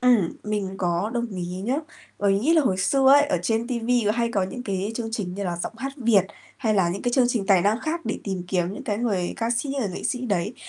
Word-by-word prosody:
Ừm, 240 Hz, -9 st, +4 dB
mình 205 Hz, -3 st, -2 dB
có 175 Hz, +4 st, 0 dB
đồng 235 Hz, 0 st, 0 dB
ý 180 Hz, -, -3 dB, 0.2 s
nhá. 250 Hz, +7 st, 0 dB, 0.4 s
Bởi 200 Hz, -1 st, +3 dB
mình 195 Hz, -, +1 dB
nghĩ 320 Hz, +5 st, +3 dB
là 315 Hz, -, +5 dB
hồi 190 Hz, -8 st, +1 dB
xưa 265 Hz, +8 st, +2 dB
ấy 285 Hz, -, +7 dB
ở 180 Hz, -, +1 dB
trên 225 Hz, +3 st, 0 dB
ti 245 Hz, -2 st, -2 dB
vi 240 Hz, +1 st, +2 dB
có 210 Hz, -, +3 dB
hay 235 Hz, 0 st, 0 dB
có 195 Hz, -, +1 dB
những 220 Hz, +7 st, -4 dB
cái 200 Hz, 0 st, -2 dB
chương 225 Hz, -1 st, -3 dB
trình 185 Hz, -5 st, -3 dB
như 200 Hz, -, -4 dB
là 175 Hz, -2 st, -2 dB
Giọng -, -, -4 dB
hát 270 Hz, +2 st, -4 dB
Việt 225 Hz, -7 st, +4 dB, 0.3 s
hay 215 Hz, -2 st, 0 dB
là 185 Hz, -3 st, +3 dB
những 190 Hz, +3 st, -3 dB
cái 245 Hz, -, 0 dB
chương 255 Hz, -2 st, +4 dB
trình 225 Hz, -6 st, -1 dB
tài 190 Hz, -3 st, +5 dB
năng 215 Hz, +3 st, +2 dB
khác 325 Hz, +2 st, -2 dB
để -, -, -2 dB
tìm 190 Hz, -3 st, -3 dB
kiếm 180 Hz, -1 st, 0 dB
những -, -, -7 dB
cái 205 Hz, 0 st, -1 dB
người 195 Hz, -7 st, 0 dB
ca 230 Hz, 0 st, -1 dB
sĩ, 240 Hz, +4 st, -1 dB
người 210 Hz, -, 0 dB
nghệ 180 Hz, -, -6 dB
sĩ 250 Hz, -, -1 dB
đấy, 200 Hz, -1 st, -1 dB
210 Hz, 280 wpm, -24 LUFS, 190-240 Hz, 0.4 s, ấy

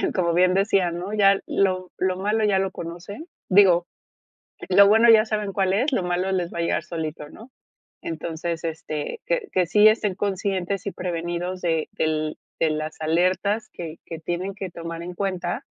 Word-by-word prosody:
como 170 Hz, -3 st, +1 dB
bien 180 Hz, +1 st, +4 dB
decía, 195 Hz, -2 st, +2 dB
¿no? 180 Hz, +4 st, -5 dB
Ya 200 Hz, -2 st, +4 dB
lo 185 Hz, -2 st, 0 dB
lo 185 Hz, 0 st, 0 dB
malo 210 Hz, +3 st, 0 dB
ya 200 Hz, -2 st, +3 dB
lo 190 Hz, 0 st, -1 dB
conocen, 175 Hz, -, -8 dB, 0.2 s
digo, 185 Hz, -3 st, +5 dB, 0.8 s
lo 200 Hz, +2 st, +7 dB
bueno 225 Hz, +3 st, +6 dB
ya 220 Hz, -1 st, +7 dB
saben 210 Hz, -3 st, -2 dB
cuál 190 Hz, -1 st, +1 dB
es, 255 Hz, +9 st, +1 dB
lo 250 Hz, -8 st, 0 dB
malo 180 Hz, +2 st, -1 dB
les 180 Hz, -2 st, -1 dB
va -, -, -5 dB
a -, -, +1 dB
llegar 170 Hz, -1 st, 0 dB
solito, 155 Hz, -3 st, -5 dB
¿no? 230 Hz, +10 st, -14 dB, 0.5 s
Entonces, 165 Hz, 0 st, -4 dB
este, 155 Hz, -2 st, -4 dB
que 170 Hz, -, 0 dB
que 180 Hz, -2 st, +1 dB
sí 210 Hz, +4 st, +6 dB
estén 215 Hz, -3 st, +2 dB
conscientes 195 Hz, -1 st, -2 dB
y -, -, -1 dB
prevenidos 175 Hz, +1 st, -4 dB
de 165 Hz, -2 st, 0 dB
del 155 Hz, -1 st, -1 dB, 0.2 s
de 160 Hz, -1 st, +2 dB
las 155 Hz, +1 st, -4 dB
alertas 185 Hz, +7 st, +1 dB
que 165 Hz, -2 st, -7 dB
que 165 Hz, -, -6 dB
tienen 175 Hz, +4 st, -4 dB
que 195 Hz, -3 st, -6 dB
tomar 165 Hz, 0 st, -6 dB
en 180 Hz, +1 st, -6 dB
cuenta 180 Hz, -2 st, -3 dB
180 Hz, 180 wpm, -24 LUFS, 170-200 Hz, 0.8 s, lo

